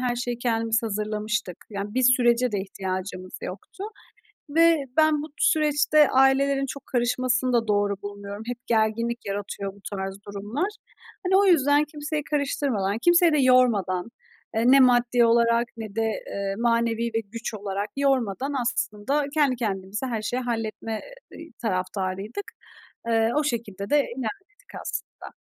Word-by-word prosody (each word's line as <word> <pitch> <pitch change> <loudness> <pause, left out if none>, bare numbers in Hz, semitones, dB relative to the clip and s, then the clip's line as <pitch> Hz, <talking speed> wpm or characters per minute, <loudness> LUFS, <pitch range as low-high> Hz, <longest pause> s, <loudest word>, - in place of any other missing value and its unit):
her 245 -1 0
şeyi 240 -1 -3
kendimiz 230 -1 0
hazırlamıştık. 215 -2 -2
Yani, 200 +1 -5
bir 255 - +1
sürece 245 -1 +4
de 200 - 0
ihtiyacımız 185 -1 -5
yoktu. 210 - -7 0.7
Ve 330 +2 +5 0.2
ben 310 -2 +4
bu - - -5
süreçte 300 -1 +4
ailelerin 270 +1 +3
çok 275 +1 -8
karışmasını 250 +1 +1
da 230 -2 +1
doğru 205 -1 +1
bulmuyorum, 200 +1 -7
hep 240 -1 -6
gerginlik 230 +1 +1
yaratıyor 200 -1 -4
bu 200 - -18 0.2
tarz 195 0 -4
durumlar. 205 - -3 0.6
Hani, 380 +1 +3
o 400 - +5
yüzden 290 -4 +4
kimseyi 300 0 -4
karıştırmadan, 265 -9 -1
kimseyi 345 +3 +5
de 300 - +3
yormadan, 230 -7 +3 0.4
eee, 225 - +1
ne 275 - +7
maddi 245 -1 +4
olarak 235 +1 +3
ne 215 -3 -7
de, 225 - +1 0.2
eee, 195 0 -3
manevi 230 0 +1
bir 225 -1 0
güç 230 -1 -5
olarak 200 0 -3
yormadan 270 -2 0
aslında 240 +4 -1
kendi 285 -5 +3
kendimize 205 +1 -3
her 225 -3 -3
şeyi 250 +4 -2
halletme, 225 -2 -3 0.3
eee, 325 0 -10
taraftarıydık. 195 - -3 0.6
Eee, 225 0 +3
o 300 - +2
şekilde 210 -7 -3
de 295 - +5
evlenmedik 385 - -5
aslında. - - -7
235 Hz, 140 wpm, -25 LUFS, 205-270 Hz, 0.7 s, ne